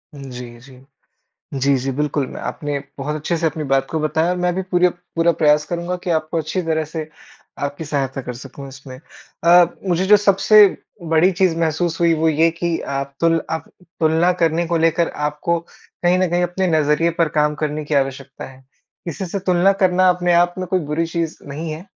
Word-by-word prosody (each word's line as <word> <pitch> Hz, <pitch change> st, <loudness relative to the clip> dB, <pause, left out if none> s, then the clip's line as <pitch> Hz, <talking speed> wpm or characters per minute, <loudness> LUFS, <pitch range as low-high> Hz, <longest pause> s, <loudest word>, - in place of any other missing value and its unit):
जी, 125 Hz, -3 st, -9 dB
जी, 130 Hz, +1 st, -16 dB, 0.8 s
जी, 140 Hz, +1 st, +2 dB
जी, 130 Hz, +1 st, -2 dB
बिल्कुल, 145 Hz, 0 st, -1 dB
मैं -, -, -8 dB
आपने 145 Hz, -2 st, -4 dB, 0.2 s
बहुत 150 Hz, +3 st, -3 dB
अच्छे 160 Hz, +3 st, -2 dB
से 165 Hz, -, -1 dB
अपनी 155 Hz, -1 st, -2 dB
बात 135 Hz, -1 st, +1 dB
को 160 Hz, -, -1 dB
बताया 160 Hz, +3 st, 0 dB
मैं 180 Hz, 0 st, 0 dB
भी 190 Hz, -, -2 dB
पूरा 180 Hz, -1 st, +2 dB, 0.3 s
पूरा 165 Hz, +1 st, +3 dB
प्रयास 150 Hz, -2 st, +3 dB
करूँगा 175 Hz, +3 st, -3 dB
कि 180 Hz, -, -2 dB
आपको 160 Hz, 0 st, 0 dB
अच्छी 160 Hz, +4 st, -2 dB
तरह 160 Hz, -1 st, -1 dB
से 155 Hz, 0 st, -6 dB, 0.5 s
आपकी 145 Hz, +3 st, -4 dB
सहायता 135 Hz, -3 st, -2 dB
कर 125 Hz, -, -6 dB
सकूँ 135 Hz, +2 st, -10 dB
इसमें। 130 Hz, -1 st, -11 dB, 0.5 s
अ, 175 Hz, +1 st, +7 dB, 0.2 s
मुझे 180 Hz, +1 st, +1 dB
जो 210 Hz, -, +7 dB
सबसे 205 Hz, +1 st, +6 dB, 0.4 s
बड़ी 165 Hz, +2 st, +3 dB
चीज़ 180 Hz, -2 st, +1 dB
महसूस 165 Hz, +1 st, -1 dB
हुई 170 Hz, -1 st, +4 dB
वो 160 Hz, +1 st, +1 dB
ये 160 Hz, +2 st, +3 dB
कि 170 Hz, 0 st, -2 dB
आप 140 Hz, 0 st, -4 dB
तुल 165 Hz, 0 st, +3 dB
आप 160 Hz, 0 st, -4 dB, 0.3 s
तुलना 160 Hz, +3 st, +3 dB
करने 165 Hz, +1 st, +2 dB
को 170 Hz, +1 st, 0 dB
लेकर 165 Hz, +1 st, +2 dB, 0.2 s
आपको 170 Hz, +3 st, -1 dB, 0.4 s
कहीं 180 Hz, +1 st, +3 dB
न 185 Hz, -, +2 dB
कहीं 175 Hz, 0 st, +1 dB
अपने 175 Hz, +2 st, -1 dB
नज़रिए 150 Hz, +3 st, +2 dB
पर 165 Hz, -, +2 dB
काम 150 Hz, 0 st, +2 dB
करने 150 Hz, 0 st, -3 dB
की 145 Hz, -, -3 dB
आवश्यकता 135 Hz, -1 st, -2 dB
है। 130 Hz, 0 st, -12 dB, 0.4 s
किसी 175 Hz, +3 st, -5 dB
से 190 Hz, +3 st, -3 dB
तुलना 185 Hz, 0 st, +3 dB
करना 185 Hz, 0 st, +4 dB
अपने 180 Hz, 0 st, +2 dB
आप 175 Hz, +1 st, +3 dB
में 185 Hz, -, -3 dB
कोई 185 Hz, +1 st, +1 dB
बुरी 165 Hz, +2 st, 0 dB
चीज़ 165 Hz, -1 st, -3 dB
नहीं 155 Hz, +3 st, -5 dB
है, 160 Hz, +4 st, -7 dB
160 Hz, 195 wpm, -20 LUFS, 145-175 Hz, 0.8 s, अ